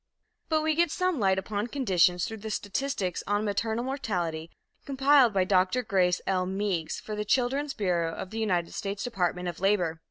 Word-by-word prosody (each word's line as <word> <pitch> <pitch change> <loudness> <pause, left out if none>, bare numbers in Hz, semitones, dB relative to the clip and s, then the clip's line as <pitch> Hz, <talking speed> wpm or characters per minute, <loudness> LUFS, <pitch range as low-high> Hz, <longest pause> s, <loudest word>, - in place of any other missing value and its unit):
But 310 -1 +2
we 315 0 +2
get 340 +2 +2
some 365 -1 0
light 190 -2 +3
upon 205 +3 -2
conditions 180 - +2
through 225 - -6
the 220 +1 -7
statistics 205 -2 -2
on 205 +1 0
maternal 220 +3 -1
mortality, 175 - -3 0.3
compiled 270 -2 +4
by 195 -2 +2
Dr. 185 +6 +2
Grace 185 -4 +1
L. 185 -1 0
Meigs, 190 -4 -2
for 215 - -6
the 210 - -2
Children's 270 +6 0
Bureau 175 -5 0
of 185 - -7
the 225 - -4
United 180 -6 0
States 200 0 -4
Department 180 -6 -1
of 175 - -5
Labor. 180 -4 +1
205 Hz, 180 wpm, -28 LUFS, 180-245 Hz, 0.3 s, compiled